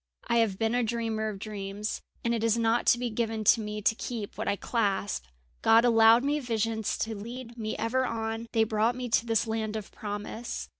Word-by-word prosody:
"I 235 - +2
have 220 -5 +2
been 225 +2 0
a 245 - +2
dreamer 225 -2 -1
of 205 - -6
dreams, 205 0 -5 0.2
and 235 - +1
it 225 -1 -1
is 230 0 +3
not 230 +1 +1
to - - +6
be 245 -1 -2
given 225 -1 -1
to 220 +2 +5
me 210 0 -5
to 220 - +4
keep 225 -2 -5
what - - -4
I 200 - +2
clasp. 205 - -1 0.4
God 230 +2 +6
allowed 225 0 +6
me 290 +2 +1
visions 225 -4 -1
to 225 - -2
lead 235 +3 -8
me 220 -2 -4
ever 255 +3 0
on; 225 -1 -3
they 225 - +3
brought 220 +2 +1
me 250 -1 -4
to 230 +1 +2
this 225 0 +2
land 220 -1 -2
of 215 -2 -6
promise. 210 +3 -5
225 Hz, 210 wpm, -28 LUFS, 215-235 Hz, 0.4 s, to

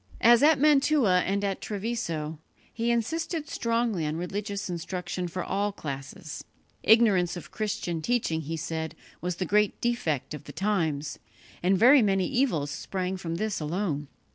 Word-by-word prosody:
As 235 +1 +7
at 300 0 +5
Mantua 280 -9 +4
and 200 +1 0
at 195 -1 -1
Treviso, 190 -8 -3 0.3
he 230 +1 -1
insisted 305 +7 -1
strongly 230 - 0
on 150 - -2
religious 200 +3 -3
instruction 180 +1 -4
for 175 +1 -4
all 200 +2 -1
classes. 140 -2 -7 0.4
Ignorance 200 -6 +4
of 175 - -10
Christian 180 -6 -2
teaching, 190 -6 0
he 160 +2 -4
said, 160 +1 -4 0.3
was 180 0 -2
the 185 - -2
great 210 +3 +2
defect 160 - -1
of 150 - -8
the 145 - -9
times, 160 -8 -1 0.4
and 185 +2 +3
very 255 +7 +7
many 195 -3 +2
evils 240 - +1
sprang 185 -1 -3
from 170 -3 -4
this 215 +3 -2
alone. 155 -2 -2
190 Hz, 150 wpm, -27 LUFS, 165-230 Hz, 0.4 s, As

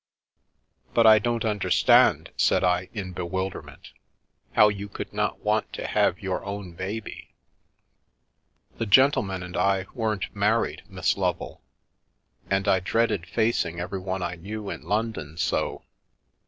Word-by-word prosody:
" 65 0 -40
But 115 - +5
I 110 -1 +8
don't 115 +1 -1
understand," 105 -3 +3
said - - +2
I 90 0 +1
in 100 -5 -5
bewilderment, 95 +2 -5 0.3
" - - -45
how 105 - +7
you 100 0 -5
could 100 - -7
want 105 0 -2
not 105 +1 +1
to - - -5
have 95 - +1
your 95 -1 -2
own 100 -2 -6
baby? 95 +5 -7 0.5
" - - -48
" - - -38
The 115 - -1
gentleman 100 -6 +3
and 90 0 -8
I 95 -1 +1
weren't 110 -6 -2
married, 105 +3 +1
Miss - - 0
Lovel. - - -2 0.9
And 95 +1 0
I 95 -1 +4
dreaded 105 -2 0
facing 110 -7 0
everyone 95 +1 -3
I 90 - -2
knew 100 +4 -6
in - - -6
London 105 -8 -3
so. 85 - -1
100 Hz, 145 wpm, -25 LUFS, 90-110 Hz, 0.9 s, I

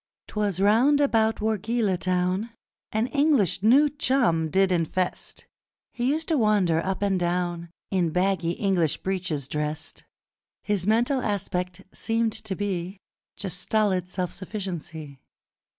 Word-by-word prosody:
'Twas 205 -4 -1
round 235 +9 +4
about 225 -6 +2
Wargeilah 220 -2 0
town 185 +4 0 0.4
An 220 +2 +1
English 280 - +2
new 260 +8 +6
chum 245 - +1
did 190 +3 +2
infest: 180 +1 -2 0.5
He 245 +1 0
used 315 +3 -1
to 315 -4 +2
wander 195 -7 +2
up 190 +1 -2
and 195 -2 +1
down 175 -1 -1 0.2
In 180 -4 +1
baggy 180 0 +1
English 180 -6 +1
breeches 185 -8 -2
drest 150 +2 -4 0.6
His 205 -3 -1
mental 240 +5 +2
aspect 180 -3 -2
seemed 225 -1 0
to 220 -3 -5
be 190 -1 -3 0.4
Just 180 -2 -5
stolid 190 -4 0
self 180 -1 -3
sufficiency. 175 -7 -6
195 Hz, 125 wpm, -25 LUFS, 180-220 Hz, 0.6 s, new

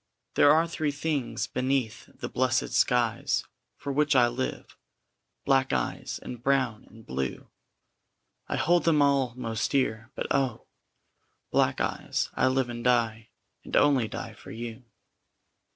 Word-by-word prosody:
There 145 - +6
are 160 +2 +4
three 160 -2 -1
things 140 -6 -2
beneath 130 -3 -2
the - - -6
blessed 130 0 +1
skies 120 -2 +2 0.3
For 140 - -4
which 150 0 +2
I 120 -2 +5
live 130 +2 -4 0.7
black 135 -1 +3
eyes, 60 -2 -2
and 120 -2 -7
brown 130 -4 +1
and 110 0 -16
blue; 65 0 -4 1.0
I - - -2
hold 175 +1 +2
them 155 -3 +4
all 135 -4 +2
most 115 -3 -2
dear; 110 -4 0
but - - -3
oh! 135 -4 0 0.9
black - - +2
eyes, - - -1
I - - +2
live 130 -1 +1
and 120 0 -6
die, 115 -3 +1 0.3
and - - -5
only 135 -6 +4
die - - -6
for - - -14
you. 115 +2 -7
125 Hz, 140 wpm, -28 LUFS, 115-140 Hz, 1.0 s, There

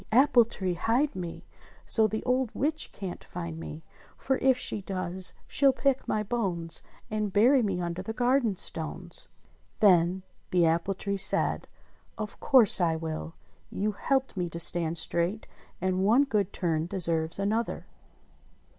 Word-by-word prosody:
Apple 245 0 +5
tree, 190 -5 -3
hide 240 - 0
me 175 -2 -6 0.4
So 220 -1 +4
the 220 +1 -4
old 255 -1 +1
witch 310 +3 -1
can't 190 -3 -7
find 170 -2 -6
me, 160 -1 -8 0.3
For 265 -1 -1
if 260 -1 +3
she 215 -4 -2
does 185 -1 -2
she'll 275 -1 +4
pick 270 0 0
my 215 - 0
bones, 190 -7 -2 0.3
And 215 -2 -1
bury 245 +7 +5
me 195 -5 -1
under 170 +1 -3
the 195 - -5
garden 245 -2 +1
stones." 160 -3 -6 0.5
Then 185 -2 +4 0.3
the 175 -2 +3
apple 170 +4 +1
tree 200 +1 -3
said, 195 - +1 0.5
"Of 215 -1 -6
course 235 -8 +6
I 165 -2 +2
will. 160 0 -5 0.3
You 210 +2 -1
helped 265 +5 -1
me 180 -2 -2
to 170 - -6
stand 170 -1 +1
straight, 170 +6 -2 0.3
and 185 +1 0
one 230 +8 +5
good 210 -8 0
turn 165 -3 -1
deserves 165 -3 -1
another." 215 +4 -1
195 Hz, 150 wpm, -28 LUFS, 170-230 Hz, 0.5 s, course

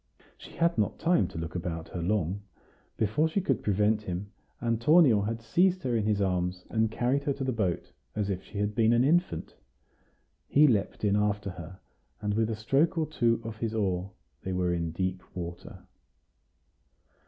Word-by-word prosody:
She - - -13
had 170 -5 +1
not 105 - 0
time 175 +1 +2
to - - -9
look 80 0 -4
about 85 -2 -4
her 90 - -5
long; 95 +1 0 0.6
before 115 +9 +2
she 160 +5 0
could 195 - 0
prevent 105 +1 +2
him, 100 0 -5 0.3
Antonio 120 +1 +4
had 115 +3 -3
seized 185 +7 +2
her 125 -2 0
in 110 -2 +1
his 105 -2 +2
arms 90 -2 -1
and 110 -1 +2
carried 125 +5 0
her 140 - +1
to 135 - -5
the 130 - 0
boat, 100 -8 -2 0.2
as 105 -2 -1
if 95 -2 -2
she 105 - -10
had 105 +1 0
been 115 +1 +3
an 120 +1 +4
infant. 160 - +1 0.9
He 150 +2 +5
leaped 110 -8 +1
in 100 0 +3
after 105 -1 0
her, 90 +1 -10 0.4
and 105 -1 -1
with 110 +1 +1
a 110 - -1
stroke 135 - +1
or 160 - +2
two 120 -6 +1
of 110 -1 -6
his 110 0 -3
oar 95 -3 -1 0.3
they 95 - -4
were 90 -1 +1
in 85 -1 -1
deep 95 +2 -2
water. 85 -1 -7
105 Hz, 185 wpm, -29 LUFS, 95-120 Hz, 0.9 s, He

